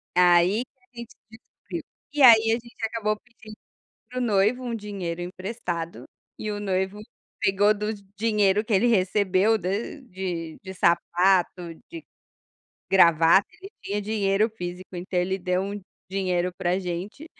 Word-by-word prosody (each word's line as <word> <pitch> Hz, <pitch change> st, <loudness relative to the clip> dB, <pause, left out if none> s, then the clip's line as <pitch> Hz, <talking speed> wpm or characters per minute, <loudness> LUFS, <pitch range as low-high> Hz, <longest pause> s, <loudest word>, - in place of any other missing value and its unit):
aí 180 Hz, +5 st, +4 dB
que 260 Hz, -, -49 dB
a -, -, -30 dB
gente 235 Hz, -, -10 dB, 0.2 s
descobriu, 225 Hz, -, -9 dB, 0.3 s
e 295 Hz, -, -1 dB
aí 225 Hz, -3 st, +8 dB
a -, -, +4 dB
gente 235 Hz, 0 st, -6 dB
acabou 215 Hz, -1 st, -1 dB
pedindo 220 Hz, -2 st, -15 dB, 0.5 s
para 255 Hz, -, -6 dB
o -, -, -1 dB
noivo 220 Hz, +2 st, +2 dB
um 235 Hz, -1 st, -3 dB
dinheiro 195 Hz, -5 st, -5 dB
emprestado 180 Hz, -2 st, -5 dB, 0.3 s
e 215 Hz, -, -4 dB
o 205 Hz, -, -3 dB
noivo 190 Hz, 0 st, -1 dB, 0.4 s
pegou 205 Hz, +2 st, +3 dB
do 210 Hz, +1 st, -3 dB, 0.2 s
dinheiro 210 Hz, -1 st, +2 dB
que 225 Hz, -, -4 dB
ele 205 Hz, +4 st, +4 dB
recebeu 200 Hz, 0 st, +2 dB
do 180 Hz, -2 st, -4 dB, 0.4 s
de 175 Hz, -4 st, -5 dB
de 190 Hz, -1 st, -8 dB
sapato, 175 Hz, 0 st, +2 dB, 0.2 s
de 330 Hz, -1 st, -8 dB, 0.9 s
gravata, 170 Hz, 0 st, +5 dB
ele 390 Hz, +2 st, -10 dB
tinha 205 Hz, +1 st, -2 dB
dinheiro 210 Hz, 0 st, +1 dB
físico, 180 Hz, -3 st, -7 dB
então 180 Hz, +1 st, -3 dB
ele 190 Hz, +2 st, 0 dB
deu 180 Hz, 0 st, 0 dB
um 200 Hz, +1 st, -5 dB, 0.3 s
dinheiro 180 Hz, -2 st, 0 dB
pra 180 Hz, 0 st, 0 dB
gente, 185 Hz, -, -5 dB
195 Hz, 150 wpm, -25 LUFS, 180-220 Hz, 0.9 s, aí